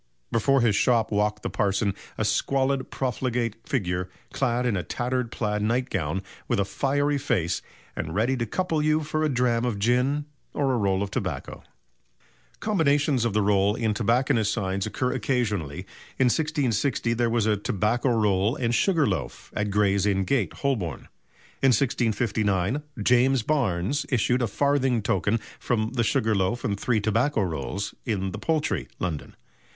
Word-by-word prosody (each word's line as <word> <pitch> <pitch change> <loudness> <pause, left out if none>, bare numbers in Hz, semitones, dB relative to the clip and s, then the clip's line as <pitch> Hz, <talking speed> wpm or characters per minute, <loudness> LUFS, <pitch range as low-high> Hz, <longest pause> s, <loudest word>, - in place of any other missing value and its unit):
Before 135 +3 +3
his 115 -4 +3
shop 115 +1 +2
walked 105 0 0
the - - -2
parson 100 0 +1 0.2
"a - - 0
squalid, 135 -1 +1
profligate 125 -3 -2
figure, 90 -7 -1 0.2
clad 125 -2 0
in 120 -4 +1
a 90 - 0
tattered 125 +3 -2
plaid 105 -2 -1
nightgown, 95 - -1 0.2
with - - +1
a 100 - +2
fiery 140 +7 0
face, 85 - 0 0.3
and 80 +2 -4
ready 115 +6 +2
to 120 -1 -2
couple 165 - -1
you 155 +1 +2
for 155 +1 -1
a 155 - +2
dram 125 -3 +1
of 120 -4 -1
gin, 125 +7 +1 0.3
or 135 -3 +1
roll 100 -3 +1
of 100 - -5
tobacco." - - -4 1.0
Combinations 145 - +2
of 115 - 0
the 105 0 +2
roll 100 0 +3
in 115 -3 0
tobacconists' 115 0 +2
signs 95 -3 -1
occur 125 -1 -1
occasionally. 105 - -1 0.4
In 130 -2 +4
1660 130 -4 0
there 120 0 +1
was 115 -2 +1
a 110 -1 +3
"Tobacco 105 +5 0
Roll 105 -1 +2
and 120 -5 -1
Sugar 165 +2 +3
Loaf" 90 - -4
at 105 0 -1
Gray's 100 -1 +2
Inn 95 -1 +2
Gate, 105 - 0
Holborn. 105 - -2 0.5
In 135 - +4
1659 110 -2 +1 0.2
James 125 +1 +4
Barnes 120 - 0
issued 125 0 +2
a 120 - +1
farthing 135 -1 +1
token 100 +3 +1 0.2
from 110 -2 -1
the 120 -2 +1
"Sugar 110 -2 +1
Loaf 100 +4 0
and 100 -5 -1
Three 115 -1 +1
Tobacco 110 +4 +1
Rolls" 85 +3 -3
in 95 -5 -2
the 105 - -6
Poultry, 155 +4 -1
London. 80 -4 -4
115 Hz, 155 wpm, -26 LUFS, 100-130 Hz, 1.0 s, In